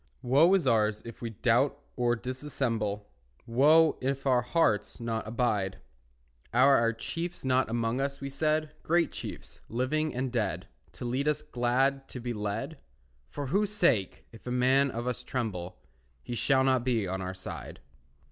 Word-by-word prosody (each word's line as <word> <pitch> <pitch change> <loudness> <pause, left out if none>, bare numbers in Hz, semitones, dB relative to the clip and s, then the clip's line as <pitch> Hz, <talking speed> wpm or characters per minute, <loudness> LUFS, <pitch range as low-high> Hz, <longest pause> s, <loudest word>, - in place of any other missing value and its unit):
Woe 140 +8 +5
is 190 - +1
ours 110 -3 +2
if 115 - -10
we 115 - -3
doubt 120 +6 +2 0.2
or 120 -1 +2
dissemble, 115 -5 -3 0.4
Woe, 150 +7 +4
if 135 +1 -2
our 130 -2 +4
hearts 120 -6 +1
not 115 -2 -3
abide. 110 -5 0 0.7
Are 130 +4 +6
our 115 0 +3
chiefs 165 +9 -5
not 130 -2 +2
among 115 +2 0
us, 140 0 -2
we 140 - -5
said, 155 +2 0
Great 170 +1 +2
chiefs, - - -8
living 140 +6 -1
and 130 0 -2
dead, 115 -4 -2 0.3
To - - -7
lead 130 +4 -1
us 150 0 0
glad 135 +1 0
to 125 - -7
be 120 0 -3
led? 110 +8 -4 0.5
For 145 - -5
whose 205 +1 +2
sake, 125 - +1
if 115 - -14
a - - -2
man 130 +3 +3
of 120 -1 -4
us 125 -2 -2
tremble, 95 -8 -4 0.5
He 120 - -6
shall 130 +3 +3
not 130 -2 +2
be 115 -6 0
on 95 +1 -3
our 95 0 -4
side. 95 - -8
125 Hz, 165 wpm, -29 LUFS, 115-140 Hz, 0.7 s, Are